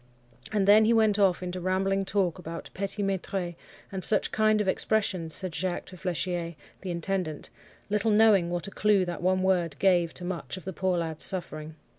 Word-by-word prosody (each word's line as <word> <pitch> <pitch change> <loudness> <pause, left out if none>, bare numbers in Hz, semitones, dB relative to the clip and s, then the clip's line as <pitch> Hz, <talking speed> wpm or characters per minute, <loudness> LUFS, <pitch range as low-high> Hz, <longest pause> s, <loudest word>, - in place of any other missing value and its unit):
And 205 -2 0
then 215 +2 +6
he 230 - +3
went 215 -2 +3
off 185 -2 +2
into 180 0 -5
rambling 195 +2 0
talk 190 -3 0
about 165 -1 -8
petit 200 +2 -3
maitres, 190 -2 -3 0.4
and 190 -2 -3
such 210 +3 +6
kind 215 0 +2
of 210 - -1
expressions, 190 -5 0
said 185 -3 -2
Jacques 180 +2 -3
to 185 - -12
Flechier, 175 -2 -3 0.3
the 190 - -6
intendant, 175 -2 -4 0.4
little 210 +2 0
knowing 210 -5 +4
what 175 -2 -3
a 200 - -7
clue 205 -2 +2
that 175 -1 -6
one 185 +1 +1
word 175 -5 +1
gave 175 -4 +2
to 180 - -2
much 180 0 -5
of 185 - -11
the 190 - -5
poor 185 0 -1
lad's 160 -2 -3
suffering. 160 -4 -2
185 Hz, 190 wpm, -27 LUFS, 175-200 Hz, 0.4 s, then